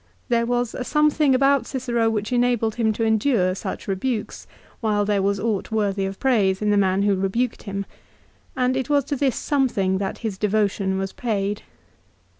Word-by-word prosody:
There 235 Hz, -1 st, +2 dB
was 245 Hz, -1 st, 0 dB
a 255 Hz, -, -4 dB
some 300 Hz, +3 st, +3 dB
thing 290 Hz, -3 st, +3 dB
about 275 Hz, +1 st, +3 dB
Cicero 240 Hz, -4 st, 0 dB
which 215 Hz, +1 st, -2 dB
enabled 240 Hz, -2 st, +1 dB
him 225 Hz, -1 st, +1 dB
to 225 Hz, -, -2 dB
endure 220 Hz, -4 st, +2 dB
such 190 Hz, 0 st, -6 dB
rebukes 210 Hz, +3 st, -3 dB, 0.3 s
while 210 Hz, -3 st, +1 dB
there 205 Hz, -1 st, +1 dB
was 200 Hz, +1 st, 0 dB
aught 210 Hz, -1 st, -1 dB
worthy 200 Hz, -3 st, 0 dB
of 195 Hz, 0 st, -7 dB
praise 205 Hz, -8 st, +2 dB
in 210 Hz, -1 st, +1 dB
the -, -, +3 dB
man 195 Hz, -1 st, +2 dB
who 205 Hz, 0 st, +3 dB
rebuked 205 Hz, +6 st, -1 dB
him; 200 Hz, -1 st, -4 dB, 0.7 s
and 255 Hz, 0 st, +1 dB
it 260 Hz, -1 st, -2 dB
was 285 Hz, -1 st, +3 dB
to 285 Hz, -, -3 dB
this 270 Hz, -2 st, +1 dB
something 205 Hz, -10 st, 0 dB
that 195 Hz, -1 st, -3 dB
his 200 Hz, -4 st, -3 dB
devotion 200 Hz, -2 st, 0 dB
was 195 Hz, 0 st, -3 dB
paid. 205 Hz, -3 st, -2 dB
220 Hz, 185 wpm, -23 LUFS, 195-250 Hz, 0.7 s, some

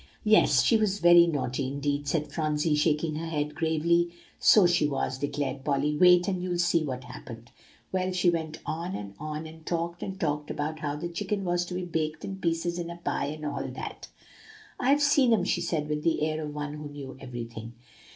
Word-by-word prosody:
"Yes, 215 Hz, 0 st, +5 dB
she 230 Hz, -, +4 dB
was 210 Hz, -2 st, +1 dB
very 175 Hz, -2 st, +7 dB
naughty 135 Hz, -4 st, -1 dB
indeed," 145 Hz, +1 st, -2 dB
said 150 Hz, +1 st, -1 dB
Phronsie, 155 Hz, -1 st, 0 dB
shaking 150 Hz, +1 st, +1 dB
her 165 Hz, +1 st, -4 dB
head 150 Hz, -2 st, -2 dB
gravely. 170 Hz, +2 st, +2 dB, 0.3 s
"So 210 Hz, -4 st, +7 dB
she 175 Hz, -3 st, +3 dB
was," 135 Hz, -2 st, -2 dB
declared 140 Hz, -1 st, -3 dB
Polly; 145 Hz, +1 st, +1 dB
"wait, 180 Hz, +2 st, +6 dB
and 185 Hz, -2 st, -1 dB
you'll 180 Hz, -1 st, -2 dB
see 175 Hz, -1 st, +2 dB
what 130 Hz, -3 st, -4 dB
happened. 120 Hz, -1 st, -10 dB, 0.4 s
Well, 185 Hz, 0 st, 0 dB
she 180 Hz, -1 st, +3 dB
went 160 Hz, -2 st, -3 dB
on, 170 Hz, +3 st, -3 dB
and 100 Hz, -1 st, -6 dB
on, 155 Hz, +1 st, -5 dB
and 160 Hz, 0 st, -11 dB
talked, 170 Hz, +1 st, -3 dB
and 190 Hz, 0 st, -5 dB
talked, 150 Hz, -1 st, -1 dB
about 155 Hz, +1 st, -3 dB
how 145 Hz, -2 st, -2 dB
the 155 Hz, +4 st, -4 dB
chicken 195 Hz, +4 st, -3 dB
was 175 Hz, 0 st, +1 dB
to 180 Hz, -, -6 dB
be 180 Hz, 0 st, -3 dB
baked 160 Hz, -2 st, -2 dB
in 195 Hz, -, -5 dB
pieces 170 Hz, -1 st, -1 dB
in 170 Hz, -1 st, -4 dB
a 170 Hz, -, -7 dB
pie, 170 Hz, -, -2 dB
and 155 Hz, +1 st, -6 dB
all 145 Hz, -, -2 dB
that. -, -, -7 dB, 0.7 s
"'I've 280 Hz, +3 st, +3 dB
seen 280 Hz, -4 st, +4 dB
'em!' 205 Hz, -5 st, +2 dB
she 175 Hz, -, 0 dB
said 165 Hz, -3 st, -1 dB
with 150 Hz, 0 st, -2 dB
the 165 Hz, -2 st, +1 dB
air 155 Hz, 0 st, -1 dB
of 150 Hz, -, -5 dB
one 145 Hz, 0 st, -4 dB
who 150 Hz, -1 st, -7 dB
knew 140 Hz, -2 st, -8 dB
everything. 115 Hz, -3 st, -7 dB
160 Hz, 205 wpm, -28 LUFS, 145-175 Hz, 0.7 s, very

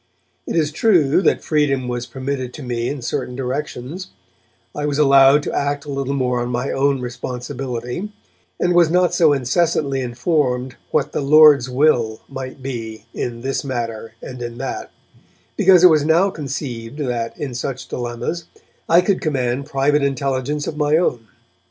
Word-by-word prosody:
It -, -, -3 dB
is 155 Hz, -2 st, +1 dB
true 160 Hz, -4 st, +3 dB
that -, -, +2 dB
freedom 140 Hz, -4 st, +1 dB
was 120 Hz, 0 st, -3 dB
permitted 130 Hz, -1 st, -4 dB
to 150 Hz, -, -8 dB
me 120 Hz, -1 st, -2 dB
in 140 Hz, -4 st, -5 dB
certain 125 Hz, -, -3 dB
directions; 135 Hz, +5 st, -4 dB, 0.7 s
I 150 Hz, 0 st, -2 dB
was 145 Hz, -1 st, -1 dB
allowed 140 Hz, 0 st, +6 dB
to -, -, -4 dB
act 145 Hz, 0 st, -1 dB
a 145 Hz, -, -6 dB
little 140 Hz, 0 st, -2 dB
more 125 Hz, -2 st, 0 dB
on 120 Hz, -, -3 dB
my 125 Hz, +2 st, -2 dB
own 135 Hz, -1 st, +1 dB
responsibility, 125 Hz, -, -5 dB, 0.5 s
and 180 Hz, -, +2 dB
was 175 Hz, -2 st, +5 dB
not 180 Hz, +1 st, +2 dB
so 160 Hz, -4 st, +4 dB
incessantly 140 Hz, 0 st, +1 dB
informed 125 Hz, 0 st, -1 dB
what 150 Hz, -, 0 dB
'the -, -, -2 dB
Lord's 145 Hz, -2 st, +6 dB
will' 125 Hz, -5 st, +2 dB
might 130 Hz, -1 st, -8 dB
be 115 Hz, -5 st, -6 dB
in 115 Hz, -1 st, -4 dB
this 135 Hz, +2 st, -2 dB
matter 115 Hz, -4 st, -4 dB
and 125 Hz, -1 st, -8 dB
in 120 Hz, -1 st, -6 dB
that, 135 Hz, +1 st, -5 dB, 0.7 s
because 185 Hz, -2 st, +5 dB
it 180 Hz, -, +9 dB
was 155 Hz, -2 st, +3 dB
now 170 Hz, +6 st, +3 dB
conceived 135 Hz, -6 st, -5 dB
that, 120 Hz, -5 st, -3 dB
in 135 Hz, -4 st, -4 dB
such 130 Hz, +1 st, -4 dB
dilemmas, 120 Hz, +8 st, -4 dB, 0.4 s
I 170 Hz, +2 st, +6 dB
could 190 Hz, +1 st, 0 dB
command 135 Hz, -2 st, -1 dB
private 145 Hz, +1 st, +2 dB
intelligence 140 Hz, +1 st, -1 dB
of 150 Hz, -, -5 dB
my 150 Hz, 0 st, +3 dB
own. 120 Hz, -10 st, -1 dB
135 Hz, 165 wpm, -20 LUFS, 125-150 Hz, 0.7 s, it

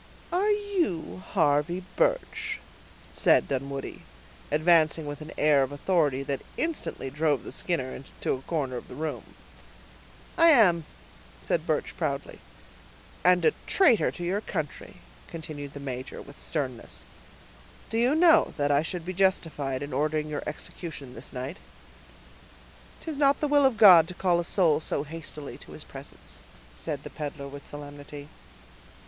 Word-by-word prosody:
"Are 390 Hz, +4 st, +2 dB
you 355 Hz, -, -1 dB
Harvey 150 Hz, +6 st, +2 dB
Birch?" -, -, 0 dB, 0.5 s
said -, -, +4 dB
Dunwoodie, 135 Hz, 0 st, -4 dB, 0.5 s
advancing 155 Hz, 0 st, +4 dB
with 145 Hz, +1 st, -6 dB
an 155 Hz, -, -8 dB
air 150 Hz, -2 st, +4 dB
of 135 Hz, 0 st, 0 dB
authority 145 Hz, -3 st, +1 dB
that 140 Hz, -1 st, -3 dB, 0.2 s
instantly 320 Hz, -, -2 dB
drove 150 Hz, -3 st, +1 dB
the -, -, -7 dB
Skinner 135 Hz, -7 st, -2 dB, 0.2 s
to -, -, +1 dB
a 130 Hz, -, -4 dB
corner 135 Hz, -4 st, -2 dB
of -, -, -8 dB
the -, -, -10 dB
room. 150 Hz, -4 st, -5 dB, 1.0 s
"I 335 Hz, -, +8 dB
am," 190 Hz, -, +6 dB, 0.6 s
said -, -, -1 dB
Birch, -, -, -1 dB
proudly. -, -, -3 dB, 0.8 s
"And 180 Hz, -2 st, +5 dB
a 155 Hz, -, +5 dB
traitor 285 Hz, -, +5 dB
to 175 Hz, -, -7 dB
your 190 Hz, +4 st, 0 dB
country," 155 Hz, -8 st, -5 dB, 0.3 s
continued 150 Hz, -3 st, -7 dB
the 140 Hz, -, -7 dB
major, 130 Hz, -2 st, -6 dB
with 140 Hz, +1 st, -12 dB
sternness. 130 Hz, -7 st, -4 dB, 0.9 s
"Do 225 Hz, -, +1 dB
you 250 Hz, +5 st, +3 dB
know 330 Hz, 0 st, +5 dB
that 145 Hz, -1 st, +1 dB
I 145 Hz, 0 st, +4 dB
should 165 Hz, +1 st, -4 dB
be 185 Hz, -, -3 dB
justified 160 Hz, -8 st, 0 dB
in 145 Hz, -1 st, -6 dB
ordering 150 Hz, +2 st, 0 dB
your 150 Hz, -, -3 dB
execution 150 Hz, -3 st, -7 dB
this 120 Hz, +1 st, -8 dB
night?" 130 Hz, +7 st, -5 dB, 1.4 s
"'Tis 315 Hz, -3 st, -5 dB
not 280 Hz, -1 st, +4 dB
the 300 Hz, -, +1 dB
will 285 Hz, -1 st, +5 dB
of 250 Hz, -4 st, -2 dB
God 180 Hz, -6 st, +9 dB
to 180 Hz, -, -8 dB
call 175 Hz, -2 st, +2 dB
a 175 Hz, -, -2 dB
soul 165 Hz, -5 st, +3 dB
so 150 Hz, -2 st, -1 dB
hastily 155 Hz, -1 st, -8 dB
to -, -, -13 dB
His -, -, -9 dB
presence," -, -, -10 dB, 0.3 s
said -, -, -5 dB
the -, -, -8 dB
peddler 145 Hz, -1 st, -5 dB
with 140 Hz, 0 st, -10 dB
solemnity. 145 Hz, 0 st, -9 dB
155 Hz, 150 wpm, -27 LUFS, 140-185 Hz, 1.4 s, God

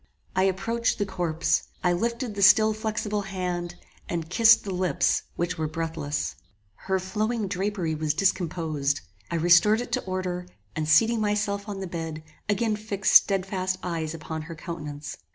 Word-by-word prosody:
I 185 Hz, +1 st, +3 dB
approached 225 Hz, +5 st, 0 dB
the 205 Hz, -, 0 dB
corpse: 175 Hz, -4 st, 0 dB, 0.2 s
I 180 Hz, -1 st, +3 dB
lifted 235 Hz, +4 st, -2 dB
the 200 Hz, -, -4 dB
still 215 Hz, +3 st, +6 dB
flexible 215 Hz, -1 st, -2 dB
hand, 180 Hz, -3 st, -3 dB, 0.3 s
and 165 Hz, -1 st, -3 dB
kissed 225 Hz, +3 st, +6 dB
the 195 Hz, -, -4 dB
lips 180 Hz, -1 st, +1 dB
which 175 Hz, 0 st, -2 dB
were 155 Hz, -, 0 dB
breathless. 155 Hz, -2 st, -3 dB, 0.4 s
Her 190 Hz, -, -2 dB
flowing 215 Hz, +3 st, -1 dB
drapery 190 Hz, -3 st, -1 dB
was 155 Hz, -1 st, -1 dB
discomposed. 160 Hz, -6 st, 0 dB, 0.3 s
I 170 Hz, -, -2 dB
restored 175 Hz, +6 st, +5 dB
it 245 Hz, -, -5 dB
to -, -, 0 dB
order, 185 Hz, -1 st, -3 dB, 0.3 s
and 155 Hz, -1 st, -2 dB
seating 225 Hz, +8 st, +5 dB
myself 205 Hz, -1 st, -1 dB
on 195 Hz, -1 st, -5 dB
the -, -, -3 dB
bed, 165 Hz, -3 st, -5 dB, 0.3 s
again 215 Hz, +1 st, +1 dB
fixed 210 Hz, -2 st, -1 dB
stedfast 190 Hz, -1 st, +4 dB
eyes 165 Hz, -2 st, -3 dB
upon 160 Hz, 0 st, -5 dB
her 165 Hz, -, -6 dB
countenance. 155 Hz, -3 st, -7 dB
185 Hz, 155 wpm, -26 LUFS, 165-205 Hz, 0.4 s, still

